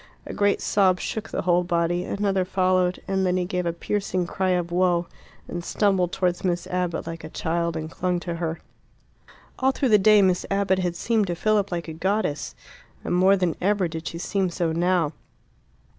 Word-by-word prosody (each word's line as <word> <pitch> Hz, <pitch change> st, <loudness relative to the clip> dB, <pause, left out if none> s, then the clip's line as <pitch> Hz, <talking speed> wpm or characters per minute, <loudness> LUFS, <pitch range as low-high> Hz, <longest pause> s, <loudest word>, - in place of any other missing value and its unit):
A -, -, -7 dB
great 205 Hz, -1 st, +1 dB
sob 190 Hz, -2 st, +3 dB
shook 220 Hz, 0 st, -4 dB
the -, -, -3 dB
whole 175 Hz, 0 st, +3 dB
body, 175 Hz, 0 st, 0 dB
another 195 Hz, -2 st, 0 dB
followed, 185 Hz, -1 st, +1 dB
and 195 Hz, 0 st, 0 dB
then 185 Hz, -1 st, +1 dB
he 180 Hz, -, 0 dB
gave 180 Hz, -1 st, -2 dB
a -, -, +1 dB
piercing 185 Hz, +1 st, -2 dB
cry 190 Hz, +2 st, -1 dB
of 175 Hz, -2 st, 0 dB
woe, 175 Hz, -1 st, +2 dB, 0.4 s
and 175 Hz, 0 st, -5 dB
stumbled 190 Hz, -2 st, +1 dB
towards 180 Hz, -1 st, -1 dB
Miss 175 Hz, -2 st, 0 dB
Abbott 180 Hz, -2 st, -2 dB
like 165 Hz, -1 st, -7 dB
a 155 Hz, -, -7 dB
child 170 Hz, +1 st, -2 dB
and 155 Hz, 0 st, -4 dB
clung 180 Hz, 0 st, -1 dB
to 170 Hz, -1 st, -4 dB
her. 165 Hz, -1 st, -3 dB, 1.0 s
All 260 Hz, -, +3 dB
through 270 Hz, -1 st, 0 dB
the 210 Hz, -2 st, +6 dB
day 210 Hz, +1 st, +6 dB
Miss 185 Hz, -1 st, +2 dB
Abbott 195 Hz, -1 st, +1 dB
had 175 Hz, -2 st, -1 dB
seemed 220 Hz, +2 st, +1 dB
to 175 Hz, -, -2 dB
Philip 205 Hz, +2 st, +1 dB
like 170 Hz, -1 st, -3 dB
a 160 Hz, -, -5 dB
goddess, 190 Hz, -2 st, -1 dB, 0.5 s
and -, -, -2 dB
more 190 Hz, +2 st, +5 dB
than 180 Hz, -3 st, 0 dB
ever 195 Hz, -1 st, +2 dB
did 165 Hz, 0 st, -6 dB
she 165 Hz, -, -5 dB
seem 190 Hz, +2 st, -1 dB
so 170 Hz, -1 st, -1 dB
now. 170 Hz, -2 st, +1 dB
180 Hz, 195 wpm, -24 LUFS, 170-195 Hz, 1.0 s, the